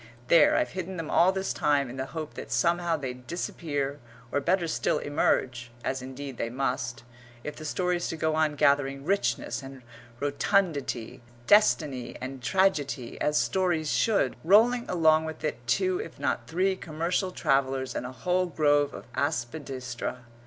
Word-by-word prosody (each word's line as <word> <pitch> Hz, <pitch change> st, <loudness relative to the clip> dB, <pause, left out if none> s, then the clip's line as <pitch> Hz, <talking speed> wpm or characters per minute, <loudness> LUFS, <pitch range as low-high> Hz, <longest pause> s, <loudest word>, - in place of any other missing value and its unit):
There 165 Hz, -3 st, +6 dB
I've -, -, +1 dB
hidden 185 Hz, 0 st, -5 dB
them 165 Hz, -2 st, -4 dB
all 175 Hz, +3 st, +5 dB
this 190 Hz, 0 st, -2 dB
time 145 Hz, -4 st, +2 dB
in 125 Hz, -, -8 dB
the 130 Hz, 0 st, -4 dB
hope 155 Hz, 0 st, -6 dB
that -, -, -8 dB
somehow 170 Hz, +6 st, +2 dB
they'd 125 Hz, -3 st, -7 dB
disappear, 145 Hz, -5 st, -3 dB, 0.3 s
or -, -, +1 dB
better 175 Hz, +3 st, +1 dB
still 155 Hz, -, 0 dB
emerge, 125 Hz, -4 st, 0 dB
as 130 Hz, 0 st, -2 dB
indeed 130 Hz, 0 st, -7 dB
they 115 Hz, -, -2 dB
must, 125 Hz, -1 st, -2 dB, 0.4 s
if 150 Hz, -, -5 dB
the 155 Hz, -, -9 dB
story's 180 Hz, +2 st, 0 dB
to 165 Hz, -, -4 dB
go 160 Hz, 0 st, 0 dB
on 155 Hz, -1 st, +1 dB
gathering 140 Hz, -1 st, +2 dB
richness 120 Hz, -10 st, 0 dB
and 135 Hz, -1 st, -10 dB, 0.4 s
rotundity, 145 Hz, -, 0 dB, 0.2 s
destiny 150 Hz, -, +3 dB
and 130 Hz, 0 st, -6 dB
tragedy, 145 Hz, -7 st, 0 dB
as 150 Hz, 0 st, +2 dB
stories 160 Hz, +5 st, +1 dB
should, 200 Hz, -, +2 dB
rolling 230 Hz, +7 st, +5 dB
along 160 Hz, -2 st, +4 dB
with 160 Hz, 0 st, -7 dB
it 150 Hz, -6 st, -2 dB
two, 370 Hz, -, +1 dB
if 440 Hz, -, -7 dB
not -, -, -1 dB
three, 190 Hz, +3 st, +1 dB
commercial 170 Hz, +3 st, -2 dB
travellers 135 Hz, -5 st, 0 dB
and 125 Hz, -, -3 dB
a -, -, -7 dB
whole 180 Hz, +6 st, 0 dB
grove 145 Hz, -3 st, +2 dB
of -, -, -9 dB
aspidistra. 130 Hz, -3 st, -3 dB
150 Hz, 160 wpm, -28 LUFS, 130-175 Hz, 0.4 s, There